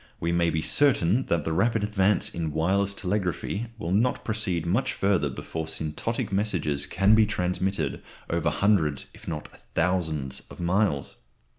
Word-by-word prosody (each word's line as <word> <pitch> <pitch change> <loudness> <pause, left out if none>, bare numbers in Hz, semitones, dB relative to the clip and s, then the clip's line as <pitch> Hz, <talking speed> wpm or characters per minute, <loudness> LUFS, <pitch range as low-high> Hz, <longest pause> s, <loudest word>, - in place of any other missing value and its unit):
We 85 - -1
may 85 0 +2
be 80 -1 -1
certain 130 -5 +3
that 85 -3 0
the 80 - -1
rapid 110 +5 +2
advance 105 -1 +2
in 80 -2 -2
wireless 95 +5 +1
telegraphy 100 +3 -2
will 85 -5 -4
not 115 +6 +1
proceed 100 -7 -1
much 100 +10 0
further 95 -7 +1
before 80 +4 -5
syntonic 80 +8 -3
messages 90 -8 0
can 100 +3 +3
be 110 -1 +5
transmitted 90 -5 -1 0.3
over 85 -2 0
hundreds 75 -4 +1
if - - -15
not 75 -3 -4 0.3
thousands 80 -6 0
of - - -12
miles. 90 -5 0
90 Hz, 150 wpm, -26 LUFS, 80-105 Hz, 0.3 s, be